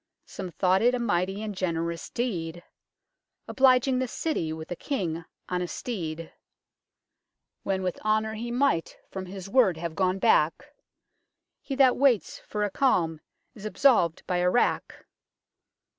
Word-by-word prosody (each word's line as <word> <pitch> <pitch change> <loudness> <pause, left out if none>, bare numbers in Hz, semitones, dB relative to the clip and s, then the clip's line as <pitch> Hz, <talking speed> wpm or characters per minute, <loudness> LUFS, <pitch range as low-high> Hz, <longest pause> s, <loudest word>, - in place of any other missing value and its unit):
Some 190 -2 -7
thought 185 +2 +2
it 245 +2 +4
a - - -2
mighty 195 -2 0
and 215 -1 -4
generous 170 -2 -2
Deed, 175 -8 -3 0.8
Obliging 260 0 +4
the 260 - 0
citty 230 - -2
with 160 +1 -7
a - - -1
King 170 - -3 0.2
on 180 0 -1
a 180 - -2
steed, 165 -8 -5 1.3
When 190 -1 -1
with 180 -1 -3
Honour 215 0 +1
he 230 +2 -5
might 245 -8 0
from 190 -1 -6
his 190 0 -8
word 195 -6 +3
have 170 0 -4
gone 185 +2 +1
back; 205 - +2 0.9
He 275 - -4
that 265 -2 +5
waits 260 -6 +2
for 210 0 -4
a 205 - -1
Calme 170 - +1 0.3
is 210 -6 -13
absolv'd 215 - +2
by 180 - 0
a 180 0 +3
Wrack. 240 - 0
195 Hz, 145 wpm, -27 LUFS, 175-240 Hz, 1.3 s, that